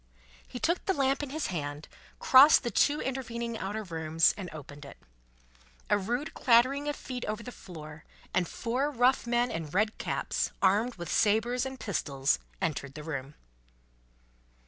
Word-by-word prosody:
He - - -7
took 340 +6 0
the 385 - +2
lamp 275 0 +1
in 290 - -5
his 310 +3 -3
hand, 145 -2 -4 0.3
crossed 275 +3 +7
the 240 - -2
two 290 +8 +2
intervening 235 -3 -3
outer 215 +1 -4
rooms, 160 -3 +2
and 190 -4 -6
opened 145 -1 -10
it. 140 - -11 0.9
A - - +5
rude 245 +10 -3
clattering 260 +4 +3
of 295 - -2
feet 250 -2 -6
over 215 +2 -4
the 250 - -7
floor, 155 -7 -11 0.3
and 180 -2 +1
four 250 - -1
rough 255 -2 +2
men 240 +1 +1
in 165 -2 -4
red 215 +7 0
caps, - - -2
armed 210 +6 +2
with 175 -3 -6
sabres 235 +5 +2
and 265 -1 -8
pistols, 140 - 0 0.2
entered 140 -3 -3
the 150 - -7
room. 145 -2 -5
225 Hz, 160 wpm, -29 LUFS, 160-255 Hz, 0.9 s, crossed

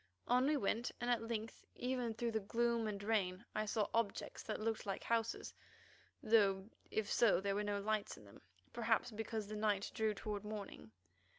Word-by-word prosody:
On 250 +2 +4
we 300 0 +3
went, 235 0 0
and 245 0 0
at 240 - +3
length 225 -1 -4
even 250 -3 -1
through 235 +1 -1
the 220 - +1
gloom 230 +2 +1
and 200 -1 -3
rain 200 -2 +1
I 215 0 -1
saw 210 -1 +1
objects 230 -3 -1
that - - -3
looked 225 0 -1
like 195 - -2
houses, 230 -1 0 0.7
though 205 -3 +4 0.2
if 220 -1 0
so 220 -7 +5
there 200 +1 0
were 205 +1 0
no 205 -1 0
lights 215 +1 -1
in 105 - -14
them, 100 - -15 0.3
perhaps 230 +1 +1
because 220 0 -3
the 215 +1 -6
night 210 -2 +1
drew 220 -1 +1
toward 205 0 -4
morning. 210 - -6
215 Hz, 185 wpm, -38 LUFS, 205-230 Hz, 0.7 s, so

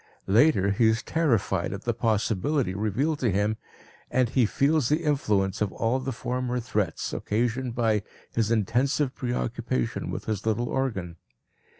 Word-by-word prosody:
Later 100 -2 +4
he 110 +3 +3
is 110 +1 +1
terrified 115 - +1
at 100 - -7
the 120 - 0
possibility 115 +2 0
revealed 110 +10 0
to 120 - +1
him 105 +3 +1 0.5
and 125 -2 +2
he 125 -2 +3
feels 140 +2 +2
the 155 +3 +1
influence 105 - +1
of 105 -2 +1
all 115 +3 0
the 135 +1 -3
former 125 +1 -2
threats, 105 -8 -2
occasioned 120 +3 -1
by 110 -3 +2 0.3
his 115 -2 0
intensive 125 +5 +1
preoccupation 65 - -2
with - - -5
his 110 -2 -2
little 115 +2 0
organ. 95 -11 -2
115 Hz, 150 wpm, -26 LUFS, 105-130 Hz, 0.5 s, Later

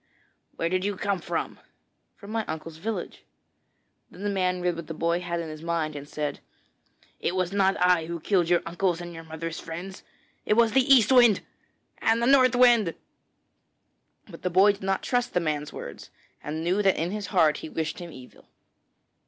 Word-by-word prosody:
'Where 165 - -1
did 185 +2 0
you 200 -1 -2
come 200 -1 -1
from?' - - -4 0.6
'From 205 0 -11
my 225 0 -1
uncle's 160 0 -6
village.' 215 +6 -5 0.9
Then 190 - -11
the 205 - 0
man 185 -2 0
read 180 -1 0
what 165 -2 -7
the 160 - -6
boy 170 +2 0
had 170 -1 -3
in 165 - -4
his 155 0 -8
mind 165 -2 -2
and 145 0 -8
said: 150 -2 -3 0.8
'It 180 - -1
was 185 -1 0
not 195 -1 +2
I 180 -3 +3
who 170 0 -4
killed 175 -1 +1
your 175 -1 +3
uncles 175 0 -1
and 175 0 -7
your 165 0 -9
mother's 160 +1 -6
friends; 175 +4 -7 0.4
it 210 - +2
was 230 -1 +4
the 265 +2 +3
East 250 -3 +6
Wind 240 -5 +6 0.6
and 225 +1 +2
the 235 - +1
North 255 -2 +5
Wind.' 240 -8 +5 1.3
But - - -12
the 180 - -1
boy 190 +4 +5
did 200 - -10
not 195 0 -1
trust 245 -1 -1
the - - +4
man's 150 -3 -2
words, - - -9 0.3
and 155 +2 -4
knew 185 +4 +1
that 195 -2 +3
in 170 +3 -1
his 210 -1 -4
heart 160 -6 +3
he - - -8
wished 160 0 -3
him 175 -1 -8
evil. 130 -3 -14
180 Hz, 195 wpm, -26 LUFS, 165-205 Hz, 1.3 s, East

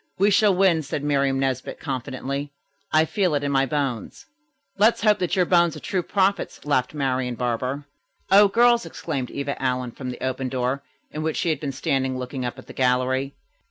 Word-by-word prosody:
"We 200 +2 +4
shall 205 -1 +4
win," 180 -4 +3
said 145 0 -4
Miriam 140 -2 +1
Nesbit 130 -1 -2
confidently. 140 +1 -4 0.4
"I 155 +1 +4
feel 185 -3 0
it 145 - -1
in 145 - -1
my 135 -1 +2
bones." 135 -5 -3 0.5
"Let's 220 +3 +4
hope 210 -1 +4
that 180 +1 0
your 180 -2 +3
bones 170 -2 +3
are - - -7
true 190 -3 -1
prophets," 195 0 0
laughed 140 -1 0
Marian 130 -3 -1
Barber. 125 +4 -2 0.5
"O 200 +1 +8
girls!" 235 +3 +4
exclaimed 135 -6 -4
Eva 140 0 -4
Allen 125 -2 -1
from 130 +1 -7
the 125 - -5
open 130 0 -2
door, 130 +1 -1 0.3
in 155 - -5
which 155 0 -1
she 170 - 0
had 155 -3 0
been 145 -2 -3
standing 130 -1 -1
looking 130 +1 -5
up 120 0 -4
at 130 - -11
the - - -11
gallery. 130 +2 +1
140 Hz, 195 wpm, -24 LUFS, 130-170 Hz, 0.5 s, O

